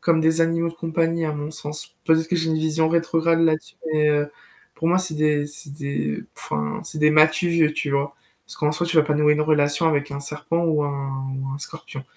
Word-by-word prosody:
comme 165 Hz, -1 st, +2 dB
des 160 Hz, +1 st, +3 dB
animaux 165 Hz, 0 st, +1 dB
de 165 Hz, -, -15 dB
compagnie 165 Hz, 0 st, -1 dB
à 155 Hz, -, -2 dB
mon 150 Hz, 0 st, -5 dB
sens. 150 Hz, -1 st, +1 dB
Peut-être 160 Hz, 0 st, +2 dB
que -, -, -1 dB
j'ai 165 Hz, -1 st, -1 dB
une 160 Hz, -, +1 dB
vision 160 Hz, 0 st, +1 dB
rétrograde 165 Hz, 0 st, +1 dB
là-dessus, 160 Hz, -1 st, 0 dB, 0.2 s
mais 150 Hz, -1 st, +2 dB, 0.7 s
pour 165 Hz, -, -1 dB
moi 180 Hz, -, +3 dB
c'est 185 Hz, -4 st, +2 dB
des 150 Hz, -1 st, +1 dB
c'est 150 Hz, +1 st, -5 dB
des 140 Hz, -, -4 dB
enfin 75 Hz, 0 st, -3 dB
c'est 155 Hz, -, -6 dB
des 150 Hz, 0 st, +4 dB
m'as-tu 155 Hz, +3 st, +4 dB
vu, 160 Hz, -3 st, +2 dB
tu 145 Hz, -, -2 dB
vois? 140 Hz, 0 st, -1 dB, 0.3 s
Parce -, -, -7 dB
qu'en 150 Hz, 0 st, 0 dB
soi, 175 Hz, +3 st, 0 dB
tu 170 Hz, 0 st, -1 dB
vas 155 Hz, -, +7 dB
pas 150 Hz, 0 st, -1 dB
nouer 150 Hz, 0 st, +3 dB
une 150 Hz, -, 0 dB
relation 150 Hz, 0 st, +2 dB
avec 145 Hz, -2 st, -1 dB
un 140 Hz, -, -5 dB
serpent 150 Hz, +4 st, -1 dB
ou 155 Hz, -3 st, +1 dB
un 135 Hz, -1 st, -4 dB
ou 135 Hz, -, -5 dB
un -, -, -6 dB
scorpion 145 Hz, -2 st, -6 dB
155 Hz, 225 wpm, -22 LUFS, 145-165 Hz, 0.7 s, vas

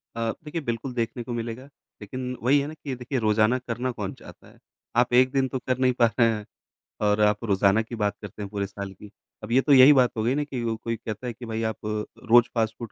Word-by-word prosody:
अ, 115 Hz, -1 st, -1 dB
देखिए 160 Hz, +2 st, -4 dB
बिल्कुल 120 Hz, 0 st, -4 dB
देखने 120 Hz, 0 st, -2 dB
को 120 Hz, -, -5 dB
मिलेगा 120 Hz, +3 st, -5 dB, 0.3 s
लेकिन 125 Hz, +5 st, -5 dB
वही 135 Hz, +4 st, +4 dB
है 140 Hz, -, -2 dB
ना 155 Hz, -, -7 dB
कि 145 Hz, -4 st, -6 dB
देखिए 125 Hz, +2 st, -3 dB
रोज़ाना 110 Hz, +2 st, +3 dB
करना 125 Hz, +1 st, -3 dB
कौन 105 Hz, -5 st, -5 dB
चाहता -, -, -15 dB
है, -, -, -21 dB, 0.4 s
आप 120 Hz, +1 st, +2 dB
एक 130 Hz, +1 st, +5 dB
दिन 135 Hz, -1 st, +1 dB
तो 130 Hz, 0 st, -4 dB
कर 130 Hz, 0 st, -2 dB
नहीं 130 Hz, -1 st, +2 dB
पा 120 Hz, -, +7 dB
रहे 115 Hz, +1 st, +3 dB
हैं 110 Hz, -2 st, -2 dB, 0.6 s
और 105 Hz, 0 st, +2 dB
आप 105 Hz, +1 st, +2 dB
रोज़ाना 100 Hz, 0 st, +3 dB
की 115 Hz, +1 st, -7 dB
बात 105 Hz, -2 st, -1 dB
करते 105 Hz, 0 st, -9 dB
हैं 100 Hz, -, -5 dB
पूरे 100 Hz, -1 st, -3 dB
साल 100 Hz, 0 st, -7 dB
की, 100 Hz, +2 st, -14 dB, 0.3 s
अब 105 Hz, -, -7 dB
ये 130 Hz, +3 st, +5 dB
तो 145 Hz, -, +3 dB
यही 135 Hz, +2 st, +9 dB
बात 125 Hz, -3 st, +4 dB
हो 110 Hz, -, 0 dB
गई 125 Hz, +4 st, +1 dB
ना 150 Hz, -, 0 dB
कि 135 Hz, -4 st, -5 dB, 0.2 s
कोई 115 Hz, 0 st, -1 dB
कहता 110 Hz, +1 st, -6 dB
है 120 Hz, -, -3 dB
कि 120 Hz, +2 st, -10 dB
भाई 115 Hz, 0 st, -3 dB
आप 110 Hz, -, -11 dB
रोज़ 115 Hz, +3 st, +2 dB
फ़ास्ट 110 Hz, -1 st, 0 dB
फ़ूड 115 Hz, -4 st, -7 dB
115 Hz, 250 wpm, -25 LUFS, 110-130 Hz, 0.6 s, यही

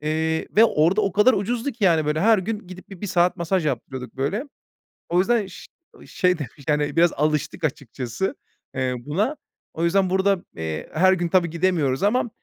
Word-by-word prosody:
Eee, 160 Hz, +1 st, -1 dB
ve 225 Hz, -, +8 dB
orada 175 Hz, +1 st, +3 dB
o 200 Hz, -3 st, 0 dB
kadar 210 Hz, +6 st, +5 dB
ucuzdu 235 Hz, +7 st, -1 dB
ki 220 Hz, -3 st, -3 dB
yani, 160 Hz, -4 st, +3 dB
böyle, 150 Hz, +1 st, 0 dB
her 220 Hz, +1 st, +5 dB
gün 210 Hz, +1 st, -4 dB
gidip 185 Hz, 0 st, -12 dB
bir 195 Hz, -3 st, -11 dB
1 205 Hz, -, -4 dB
saat 175 Hz, 0 st, +2 dB
masaj 170 Hz, -1 st, -1 dB
yaptırıyorduk, 130 Hz, 0 st, -4 dB
böyle. 165 Hz, -, -1 dB, 0.7 s
O 175 Hz, +1 st, +2 dB
yüzden 220 Hz, +1 st, +2 dB
ş 185 Hz, -, -11 dB, 0.4 s
ı -, -, -15 dB
şey 180 Hz, -4 st, +1 dB
demiş 140 Hz, -1 st, -9 dB
yani 150 Hz, 0 st, 0 dB
biraz 170 Hz, 0 st, +4 dB
alıştık 150 Hz, +3 st, -1 dB
açıkçası, 135 Hz, -, -3 dB, 0.4 s
eee, 130 Hz, -1 st, -1 dB
buna. 210 Hz, -, -1 dB, 0.4 s
O 165 Hz, -, -3 dB
yüzden 185 Hz, +2 st, +2 dB
burada, 190 Hz, 0 st, +1 dB
eee, 80 Hz, -1 st, -5 dB
her 185 Hz, +4 st, +4 dB
gün 175 Hz, -1 st, -1 dB
tabii, 180 Hz, -2 st, +2 dB
gidemiyoruz 165 Hz, -3 st, 0 dB
ama 240 Hz, +3 st, +2 dB
175 Hz, 190 wpm, -23 LUFS, 150-195 Hz, 0.7 s, ve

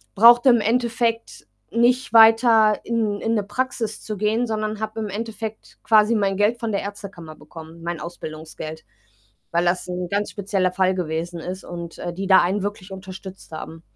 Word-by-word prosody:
brauchte 240 Hz, +4 st, +7 dB
im 240 Hz, -2 st, +5 dB
Endeffekt 230 Hz, +1 st, -1 dB, 0.3 s
nicht 245 Hz, +1 st, +2 dB
weiter 225 Hz, -1 st, +6 dB
in 220 Hz, -3 st, -1 dB
in 225 Hz, 0 st, 0 dB
'ne 205 Hz, -, 0 dB
Praxis 225 Hz, 0 st, -3 dB
zu 215 Hz, -2 st, -5 dB
gehen, 220 Hz, +4 st, +1 dB
sondern 215 Hz, -1 st, -3 dB
habe 220 Hz, +1 st, -4 dB
im 215 Hz, -, -3 dB
Endeffekt 220 Hz, +1 st, -6 dB
quasi 215 Hz, +1 st, +4 dB
mein 195 Hz, -2 st, +1 dB
Geld 210 Hz, +4 st, +1 dB
von 225 Hz, -3 st, -3 dB
der 200 Hz, -, 0 dB
Ärztekammer 195 Hz, -6 st, -8 dB
bekommen, 160 Hz, +2 st, -12 dB
mein 170 Hz, -2 st, -4 dB
Ausbildungsgeld, 160 Hz, -1 st, -8 dB, 0.7 s
weil 170 Hz, +1 st, +1 dB
das 180 Hz, +1 st, 0 dB
'n 180 Hz, -1 st, -4 dB
ganz 205 Hz, +1 st, -1 dB
spezieller 195 Hz, -2 st, -1 dB
Fall 185 Hz, 0 st, +2 dB
gewesen 170 Hz, 0 st, -3 dB
ist 185 Hz, +3 st, -6 dB
und, 170 Hz, -1 st, -8 dB
äh, 175 Hz, -, -4 dB
die 195 Hz, +2 st, -4 dB
da 190 Hz, -, +7 dB
einen 190 Hz, +3 st, 0 dB
wirklich 200 Hz, -2 st, -5 dB
unterstützt 190 Hz, -1 st, -10 dB
haben. 160 Hz, +1 st, -8 dB
205 Hz, 170 wpm, -22 LUFS, 180-225 Hz, 0.7 s, brauchte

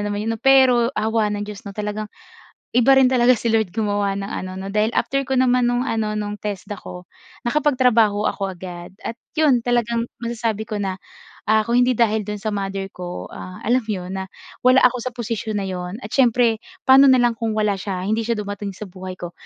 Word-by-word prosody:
naman 205 Hz, 0 st, -2 dB
'yon 225 Hz, -, 0 dB
'no. -, -, -23 dB
Pero 260 Hz, -3 st, +5 dB
awa 220 Hz, 0 st, +1 dB
ng 205 Hz, 0 st, -3 dB
Diyos 210 Hz, 0 st, -9 dB
'no 200 Hz, -, -6 dB
talagang 210 Hz, 0 st, -3 dB, 0.7 s
iba 260 Hz, +2 st, +6 dB
rin 260 Hz, -1 st, +5 dB
talaga 250 Hz, 0 st, +5 dB
si 230 Hz, 0 st, -1 dB
Lord 220 Hz, -3 st, +2 dB
gumawa 205 Hz, -2 st, 0 dB
ng 195 Hz, -, -4 dB
ano 185 Hz, 0 st, -5 dB
'no 195 Hz, -, -6 dB
dahil 215 Hz, +2 st, +2 dB
after 275 Hz, 0 st, +1 dB
ko 265 Hz, -, 0 dB
naman 250 Hz, -1 st, +3 dB
no'ng 245 Hz, +1 st, +1 dB
ano 215 Hz, -1 st, -1 dB
no'ng 210 Hz, 0 st, -4 dB
TESDA 205 Hz, -1 st, -5 dB
ko, 180 Hz, 0 st, -9 dB, 0.4 s
nakapagtrabaho 245 Hz, -7 st, +3 dB
ako 195 Hz, -1 st, -4 dB
agad. 175 Hz, -1 st, -8 dB
At 230 Hz, -, -4 dB, 0.2 s
'yon 295 Hz, -6 st, +4 dB
talagang 235 Hz, -1 st, 0 dB, 0.2 s
masasabi 230 Hz, -2 st, -2 dB
ko 210 Hz, -1 st, -3 dB
na, 190 Hz, -1 st, -2 dB, 0.5 s
ah, 220 Hz, 0 st, +4 dB
kung 240 Hz, +1 st, +3 dB
hindi 250 Hz, -1 st, +2 dB
dahil 220 Hz, -2 st, +2 dB
do'n 210 Hz, -1 st, -4 dB
sa 215 Hz, -, -1 dB
mother 195 Hz, -1 st, -3 dB
ko, 180 Hz, -1 st, -7 dB
ah, 185 Hz, 0 st, -9 dB
alam 245 Hz, +3 st, +3 dB
mo 220 Hz, -, -3 dB
'yon? 185 Hz, -2 st, -4 dB
Na 190 Hz, -, -4 dB, 0.4 s
wala 255 Hz, +1 st, +7 dB
ako 250 Hz, 0 st, +3 dB
sa 255 Hz, -, -3 dB
posisyon 220 Hz, -2 st, -3 dB
na 195 Hz, -, -3 dB
'yon 180 Hz, +1 st, -5 dB
at 215 Hz, -, -8 dB
siyempre 240 Hz, -3 st, +3 dB, 0.3 s
paano 270 Hz, +1 st, +8 dB
nalang 245 Hz, -3 st, +4 dB
kung 225 Hz, -2 st, -1 dB
wala 210 Hz, -2 st, +1 dB
siya 185 Hz, -2 st, -4 dB
hindi 220 Hz, +2 st, 0 dB
siya 235 Hz, -, +1 dB
dumating 205 Hz, 0 st, -5 dB
sa 210 Hz, -, -7 dB
buhay 185 Hz, 0 st, -8 dB
ko. 175 Hz, -1 st, -6 dB
220 Hz, 210 wpm, -21 LUFS, 200-240 Hz, 0.7 s, paano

